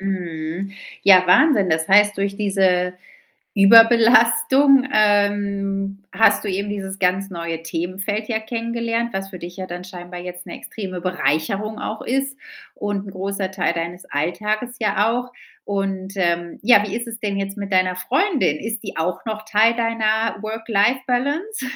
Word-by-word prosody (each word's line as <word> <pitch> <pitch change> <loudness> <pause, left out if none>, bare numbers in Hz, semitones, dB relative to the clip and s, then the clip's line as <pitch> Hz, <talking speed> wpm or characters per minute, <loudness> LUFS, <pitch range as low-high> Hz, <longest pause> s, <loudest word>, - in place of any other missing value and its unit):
Mhm. 180 -1 -4 0.3
Ja, 185 -2 +6
Wahnsinn. 230 - +4
Das 160 -1 0
heißt, 205 +1 +5
durch 200 0 -2
diese 190 -3 +1 0.6
Überbelastung, 245 - +6
ähm, 200 -1 +1
hast 225 - +3
du - - -4
eben 200 +2 -2
dieses 195 -1 -5
ganz 190 +2 0
neue 170 -2 -5
Themenfeld 190 +6 -3
ja 220 -2 0
kennengelernt, 230 +1 -3
was 195 0 -4
für 185 -2 -10
dich 175 +2 -9
ja 190 - -5
dann 180 0 -7
scheinbar 180 -1 -9
jetzt 180 0 -8
'ne - - -8
extreme 185 -4 -7
Bereicherung 185 +4 -1
auch 215 - -5
ist 270 +2 -2 0.4
und 205 -1 -3
'n - - -7
großer 195 0 -3
Teil 190 -3 0
deines 170 +2 -5
Alltages 210 - -2
ja 210 0 +1
auch. 245 +1 -3 0.3
Und, 195 -1 -3
ähm, 170 -2 -1
ja, 205 -1 +5
wie 200 - -4
ist 235 +1 -4
es 230 0 -7
denn 205 -2 -2
jetzt 195 +1 -4
mit 200 -1 -5
deiner 185 -1 +2
Freundin? 265 - +1
Ist 225 +4 -5
die 200 - -7
auch 170 +7 -3
noch 215 -1 -4
Teil 220 +1 +3
deiner 225 -1 0
Work-Life-Balance? 250 - -1
200 Hz, 155 wpm, -21 LUFS, 185-225 Hz, 0.6 s, Ja